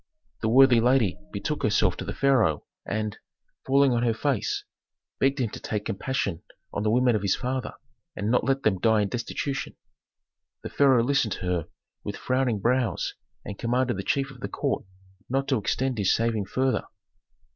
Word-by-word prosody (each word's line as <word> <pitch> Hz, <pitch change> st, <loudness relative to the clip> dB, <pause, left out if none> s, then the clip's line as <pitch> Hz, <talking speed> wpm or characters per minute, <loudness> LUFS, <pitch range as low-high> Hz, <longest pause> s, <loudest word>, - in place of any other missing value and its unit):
The 110 Hz, -, +1 dB
worthy 130 Hz, 0 st, +7 dB
lady 120 Hz, -5 st, +2 dB
betook -, -, -3 dB
herself -, -, +2 dB
to -, -, -5 dB
the -, -, -5 dB
pharaoh, 120 Hz, -, +2 dB, 0.2 s
and, 110 Hz, 0 st, -3 dB, 0.5 s
falling 140 Hz, 0 st, +4 dB
on 120 Hz, -, +1 dB
her 115 Hz, -2 st, +1 dB
face, 135 Hz, -1 st, -1 dB, 0.6 s
begged 135 Hz, +1 st, +2 dB
him 120 Hz, -6 st, -1 dB
to -, -, -7 dB
take 105 Hz, -2 st, -3 dB
compassion 100 Hz, -5 st, -2 dB, 0.3 s
on -, -, -2 dB
the 105 Hz, -, +1 dB
women 125 Hz, +1 st, +3 dB
of 105 Hz, -, 0 dB
his 100 Hz, -2 st, +2 dB
father, 130 Hz, 0 st, -3 dB, 0.4 s
and 105 Hz, +2 st, -1 dB
not 125 Hz, -, +3 dB
let 135 Hz, 0 st, 0 dB
them 95 Hz, -4 st, +2 dB
die 110 Hz, +1 st, +3 dB
in 100 Hz, -, -2 dB
destitution. 130 Hz, +4 st, -3 dB, 0.9 s
The -, -, -5 dB
pharaoh 135 Hz, -4 st, +4 dB
listened 130 Hz, -5 st, +1 dB
to -, -, -8 dB
her 90 Hz, -3 st, -1 dB, 0.4 s
with -, -, -5 dB
frowning 130 Hz, -3 st, 0 dB
brows 120 Hz, -3 st, 0 dB, 0.3 s
and 100 Hz, -, -7 dB
commanded 125 Hz, +1 st, +1 dB
the 95 Hz, -, -3 dB
chief 135 Hz, +6 st, -1 dB
of 130 Hz, -, -14 dB
the -, -, -5 dB
court -, -, -2 dB, 0.4 s
not 135 Hz, +2 st, 0 dB
to 130 Hz, -5 st, +2 dB
extend 125 Hz, +4 st, -1 dB
his 100 Hz, -, +3 dB
saving 115 Hz, -3 st, 0 dB
farther. 130 Hz, +6 st, 0 dB
120 Hz, 180 wpm, -26 LUFS, 105-130 Hz, 0.9 s, worthy